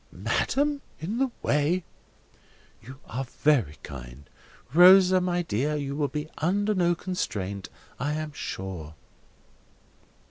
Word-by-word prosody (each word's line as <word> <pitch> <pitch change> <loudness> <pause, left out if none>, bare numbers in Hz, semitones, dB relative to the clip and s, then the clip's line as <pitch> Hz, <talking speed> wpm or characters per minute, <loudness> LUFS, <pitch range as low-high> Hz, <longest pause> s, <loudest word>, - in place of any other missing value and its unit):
"Madam! 285 +1 0 0.2
In 200 +10 -3
the 270 0 +2
way!" 150 +5 +1 1.0
"You 130 +4 -11
are 130 +4 -4
very 125 - +1
kind.—Rosa, 155 - +3
my 175 -1 0
dear, 150 +2 -1
you 140 -1 -3
will 145 -1 0
be 150 +1 -4
under 205 +6 +1
no 175 -3 +2
restraint, 100 - -3 0.3
I 145 +4 -1
am 155 -1 -4
sure." 90 - -6
150 Hz, 110 wpm, -27 LUFS, 110-180 Hz, 1.0 s, kind.—Rosa